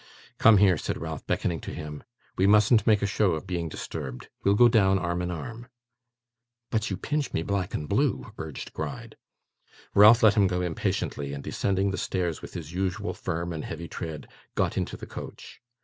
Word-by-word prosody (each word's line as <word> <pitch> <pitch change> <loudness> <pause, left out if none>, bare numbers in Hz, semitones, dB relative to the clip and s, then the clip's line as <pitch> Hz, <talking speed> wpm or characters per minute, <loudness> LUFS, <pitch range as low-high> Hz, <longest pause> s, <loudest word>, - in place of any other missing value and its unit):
'Come 115 -2 +7
here,' 95 -5 +4
said - - -3
Ralph, - - -6
beckoning 85 -2 0
to - - -6
him. 75 -1 -7 0.3
'We 95 - +3
mustn't 105 +2 +5
make 105 -2 +4
a - - +3
show 105 -2 +2
of 80 - -4
being 85 -3 -3
disturbed. 65 -5 -6
We'll 100 +1 +4
go 120 +3 +7
down 95 -4 +4
arm 85 -1 -1
in 90 - -2
arm.' 115 +8 -6 1.0
'But 110 -2 0
you 95 - -2
pinch 150 +7 -2
me 80 - 0
black 100 -1 -2
and 75 - -4
blue,' - - 0
urged 80 -3 -7
Gride. - - -6 0.8
Ralph 110 +4 +8
let 110 -2 +7
him 100 -2 +4
go 90 -1 -1
impatiently, 70 -4 -2
and 70 -1 -6
descending 100 0 0
the 95 - -3
stairs 90 -4 -2
with - - -10
his 85 -2 -6
usual 95 +3 -2
firm 85 0 -3
and 80 - -5
heavy 85 +1 -6
tread, 80 -3 -6 0.3
got - - 0
into - - -2
the - - -8
coach. - - -9
95 Hz, 190 wpm, -27 LUFS, 80-105 Hz, 1.0 s, Ralph